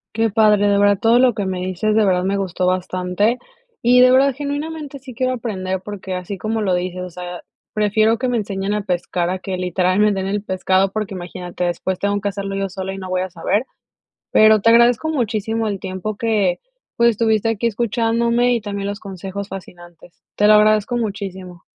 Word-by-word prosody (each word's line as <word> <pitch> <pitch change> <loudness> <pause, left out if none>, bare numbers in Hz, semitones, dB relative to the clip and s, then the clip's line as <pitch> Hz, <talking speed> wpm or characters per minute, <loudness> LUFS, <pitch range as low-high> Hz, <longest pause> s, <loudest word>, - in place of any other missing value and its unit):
Qué 225 0 +2
padre, 210 -1 +3
de 200 - +3
verdad 205 -1 +4
todo 230 +1 +4
lo 250 -1 +4
que 205 -2 -3
me 185 -1 -3
dices. 185 +4 -1
De 220 0 +4
verdad 180 -2 +2
me 195 +1 0
gustó 185 -2 -2
bastante 185 +5 0 0.4
y 245 +1 +5
de 255 0 +7
verdad, 270 +1 +4
genuinamente, 290 +1 -5
sí 260 -2 -11
quiero 255 +2 0
aprender 190 -6 -3
porque 190 -2 -6
así 180 +2 -5
como 220 +3 -2
lo 195 -4 +1
dices, 180 0 -3
o 180 - -6
sea, 180 0 -8 0.3
prefiero 215 +2 +2
que 255 - -1
me 245 - 0
enseñen 200 -2 -2
a 210 - -1
pescar 180 -2 -2
a 185 - -2
que 185 0 -4
literal 180 +1 0
me 210 0 +4
den 190 -1 -2
el 200 +1 -2
pescado, 190 0 +1
porque 215 -2 -3
imagínate, 180 0 -6
después 180 +1 -2
tengo 205 0 0
que 200 - -1
hacerlo 195 0 -4
yo 195 0 -2
sola 190 0 -5
y - - -7
no 185 -1 -7
voy 185 0 0
a 185 - -5
saber. 180 +7 -1 0.7
Pero 215 -1 +6
te 230 - +4
agradezco 235 +5 +4
muchísimo 225 -5 -1
el 200 -2 -3
tiempo 190 +3 -5
que, 205 -5 0 0.4
pues, 235 0 +4
estuviste 220 0 +1
aquí 225 +1 0
escuchándome 235 +2 +1
y 235 - -2
también 200 -1 -4
los 205 +1 -4
consejos 195 0 -7
fascinantes. 175 -2 -12
Te 210 - +3
lo 215 - +7
agradezco 215 +2 +4
muchísimo. 190 -5 -5
205 Hz, 205 wpm, -19 LUFS, 185-225 Hz, 0.7 s, de